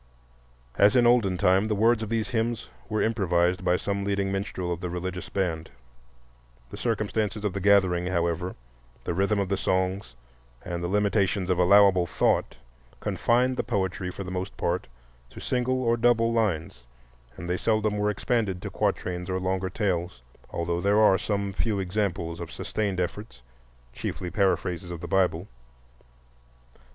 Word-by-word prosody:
As 105 +5 +6
in 120 -1 +5
olden 115 -6 +4
time, 95 +4 +3
the 110 - 0
words 115 +2 +3
of 110 - -4
these 115 -1 -1
hymns 115 -1 -1 0.2
were 110 -1 0
improvised 90 -4 +1
by 90 0 +3
some 100 +2 -2
leading 100 -1 0
minstrel 95 -2 -2
of 85 - -7
the 90 - -3
religious 90 +1 -5
band. 85 -5 -2 1.0
The - - -6
circumstances 110 -2 -1
of 100 - 0
the 100 - -3
gathering, 95 -3 +3
however, 90 0 -1 0.5
the - - -2
rhythm 100 +4 +1
of 100 -1 0
the 100 - 0
songs, 95 -8 -1 0.5
and 85 -1 -4
the - - -1
limitations 100 -1 +1
of 90 - +1
allowable 95 -1 +5
thought, - - +1 0.4
confined 125 +2 +1
the - - 0
poetry 95 -4 -2
for 100 - -6
the 90 - -7
most 95 +1 -4
part - - -1 0.4
to - - -11
single 130 +1 0
or 115 0 +2
double 115 -1 +3
lines, 85 - -1 0.6
and 85 - -7
they 90 - 0
seldom 110 +1 0
were 105 0 +1
expanded 105 -2 -1
to - - -5
quatrains 90 0 -2
or 95 0 -1
longer 95 0 -1
tales, 90 - -2 0.3
although 85 0 -2
there 100 +2 +3
are 100 -3 +5
some 100 -2 -2
few 105 +1 0
examples 90 -3 -2
of 85 -2 -7
sustained 100 -4 -2
efforts, 90 - -4 0.5
chiefly 90 +7 -5
paraphrases 95 -3 0
of 85 -1 -6
the 85 - -6
Bible. 90 0 +1
95 Hz, 160 wpm, -26 LUFS, 90-105 Hz, 1.0 s, As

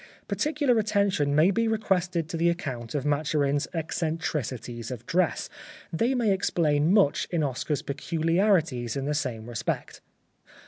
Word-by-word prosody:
Particular 290 -6 +1
attention 200 -9 +1
may 160 +6 +5
be 230 +4 +1
requested 185 -6 0
to 165 - -5
the 170 +1 +3
account 130 -9 -4
of 140 -1 -1
Maturin's 145 -1 +1
ec 165 -1 -4
centricities 135 -8 -3
of 120 -2 -7
dress. 175 +2 +1 0.5
They 235 +10 +1
may 235 -5 +2
explain 160 -4 +2
much 195 -8 +3
in 170 -3 0
Oscar's 140 +2 -2
peculiarities 160 - +1
in 135 -1 -2
the 150 - 0
same 125 -7 -3
respect. 120 -2 -4
160 Hz, 140 wpm, -27 LUFS, 140-190 Hz, 0.5 s, may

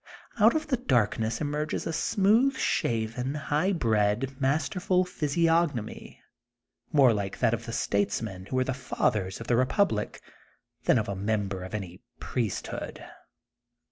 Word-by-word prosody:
Out 220 +5 +6
of 310 0 0
the 265 -4 0
darkness 115 - +1
emerges 150 +1 -2
a 165 - -2
smooth 220 +10 +3
shaven, 115 +4 -1
high 150 +5 0
bred, 115 - +1
masterful 180 +6 +1
physiognomy 165 -6 0 0.7
more 135 -5 +6
like 100 -2 -3
that - - +2
of - - -3
the - - -4
statesmen 100 -1 -1
who 130 - -4
were 130 - +3
the 130 - -2
fathers 105 -6 -1
of 115 - -7
the 120 - +2
repub 130 - +3
lic, 105 0 -3 0.7
than - - +5
of 110 - -1
a 100 - -3
member 100 -1 -1
of 95 +3 -6
any 95 -2 -6 0.2
priesthood. 115 -6 -4
130 Hz, 140 wpm, -28 LUFS, 105-165 Hz, 0.7 s, Out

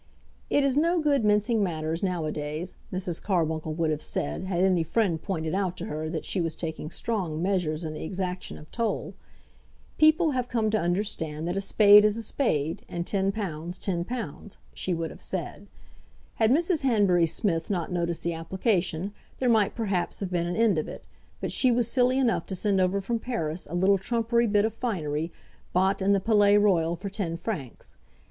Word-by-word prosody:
"It 285 - +3
is 275 -1 +2
no 335 +3 +3
good 285 -5 +2
mincing 210 +2 +2
matters 160 -3 -2
now 180 -5 -1
a 155 - -1
days," 150 +4 -4 0.2
Mrs. 185 -2 -2
Carbuncle 160 -4 -1
would 165 -1 +1
have 155 0 -2
said, 185 - -3
had 185 -1 0
any 185 -3 +3
friend 165 -1 0
pointed 160 -5 -3
out 190 -2 -1
to 175 - -5
her 155 -5 -4
that 160 -1 -4
she 190 - -1
was 165 -1 -2
taking 160 -2 -5
strong 180 -6 -2
measures 175 -3 0
in 155 -1 -4
the 155 - -6
exaction 180 +1 -4
of 155 - -14
toll. 230 -1 -2 0.9
"People 315 +1 +5
have 250 -2 -1
come 220 -3 +1
to 215 - +2
understand 170 -4 -2
that 175 - -1
a 195 - 0
spade 205 +1 +7
is 210 +1 +2
a 230 - -4
spade, 165 - -1
and 170 0 -3
£10, 195 0 +1
£10," 185 - -4 0.2
she 185 - -3
would 165 -2 -2
have - - -13
said. 190 +2 -3 0.7
Had 220 -1 +3
Mrs. 330 +4 +2
Hanbury 200 -10 +3
Smith 165 -2 -1
not 180 -4 -2
noticed 170 -2 -1
the 170 - 0
application, 185 +1 -1 0.2
there 255 - +1
might, 220 -4 +3
perhaps, 195 -6 -1
have 195 -2 -4
been 170 -1 0
an 175 - -2
end 220 -7 +3
of - - -3
it, - - -9 0.3
but - - -3
she 255 - +3
was 240 -1 +2
silly 250 +1 +2
enough 255 -4 +1
to 190 - -4
send 195 0 +1
over 185 +2 +1
from 230 +4 -2
Paris 180 -10 -3
a 170 - -4
little 190 +2 +3
trumpery 235 +3 +1
bit 205 0 +3
of 220 - -1
finery, 165 -9 -2 0.4
bought 190 +2 +2
in 195 +1 +3
the 200 - +4
Palais 205 0 +4
Royal 175 -5 +3
for 195 +3 -6
ten 180 -5 -3
francs. 165 - -6
190 Hz, 195 wpm, -27 LUFS, 165-220 Hz, 0.9 s, spade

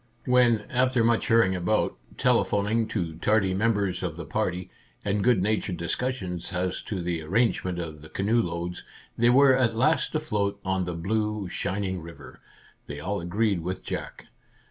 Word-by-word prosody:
When, 125 -3 +4
after 125 -1 +2
much 115 0 +2
hurrying 115 -5 +4
about, 90 +5 0 0.2
telephon 100 -1 +2
ing 115 +1 +1
to 85 -8 -3
tardy 100 0 +2
members 100 -2 +1
of 85 -4 -3
the 85 - -6
party, 90 +1 -2 0.3
and 100 0 0
good 120 -7 +3
natured 105 -3 0
discussion 90 +1 -2
as 90 0 -1
to 95 -5 -3
the 85 -2 -2
arrangement 95 +1 0
of 80 -3 -6
the 80 - -12
canoe 110 +5 +1
loads, 85 -1 -4 0.3
they 120 +1 +3
were 135 +1 +6
at 120 -3 +2
last 155 +7 +2
afloat 100 -10 -1
on 95 -1 0
the 90 -1 -4
blue, 105 +3 -1
shining 95 0 -2
river, 85 +1 -12 0.5
they 75 0 -6
all 95 +5 -2
agreed 100 +3 0
with 90 +3 -4
Jack. - - -6
100 Hz, 165 wpm, -26 LUFS, 90-115 Hz, 0.5 s, were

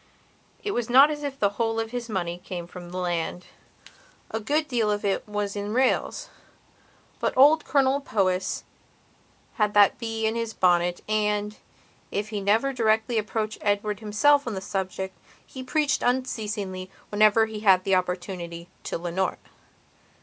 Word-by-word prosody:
It 410 - -1
was 240 - -2
not 270 +5 +7
as 295 -1 -4
if 280 -2 -4
the 200 - +3
whole 225 0 0
of 225 0 -3
his 245 -1 -5
money 175 -4 -2
came 175 -3 -5
from 175 0 -10
the 180 - -6
land; 175 0 -2 0.9
a 220 - -2
good 295 +8 0
deal 230 -4 +1
of 205 0 -1
it 200 +1 -1
was 205 -1 -2
in 205 +2 -3
rails. 260 +1 +1 0.9
But - - -1
old 295 +4 +6
Colonel 275 0 +2
Powys 190 -7 0 0.9
had 210 -2 +1
that 205 -1 +5
bee 225 -1 -2
in 220 - +1
his 230 -1 -3
bonnet 175 -1 +2
and, 210 -1 0 0.5
if 205 +1 -3
he 210 -2 -3
never 220 +7 +2
directly 225 -1 +2
approached 215 0 -3
Edward 205 0 0
himself 240 +7 +3
on 225 - -2
the - - -2
subject, 190 0 -4 0.3
he 260 - -9
preached 280 +1 0
unceasingly, 210 -7 -2 0.2
whenever 215 +1 +4
he 220 -1 -6
had 190 -3 +4
the 195 - 0
opportunity, 180 -2 -2 0.2
to - - -2
Leonora. 175 +2 -2
210 Hz, 155 wpm, -25 LUFS, 190-235 Hz, 0.9 s, not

